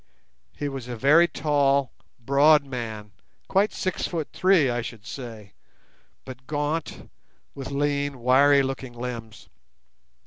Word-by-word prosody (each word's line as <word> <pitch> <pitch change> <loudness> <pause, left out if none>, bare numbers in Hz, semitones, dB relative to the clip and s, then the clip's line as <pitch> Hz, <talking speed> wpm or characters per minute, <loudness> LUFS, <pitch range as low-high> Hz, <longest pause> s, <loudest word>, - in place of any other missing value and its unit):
He 145 - -3
was 135 -3 -6
a 125 - -5
very 150 +8 +5
tall, 140 -4 +1 0.3
broad 140 +4 +4
man, 110 -5 -6 0.4
quite 200 +2 +2
six 185 -1 -2
foot 165 -4 -4
three, 185 -6 +4
I 120 -1 -1
should 115 -2 -9
say, 115 -6 -9 0.7
but 130 0 -11
gaunt, 150 +2 -3 0.5
with 135 -1 -7
lean, 140 -1 -1
wiry 140 +3 +5
looking 135 -2 -5
limbs. 120 -3 -7
135 Hz, 125 wpm, -25 LUFS, 120-145 Hz, 0.7 s, very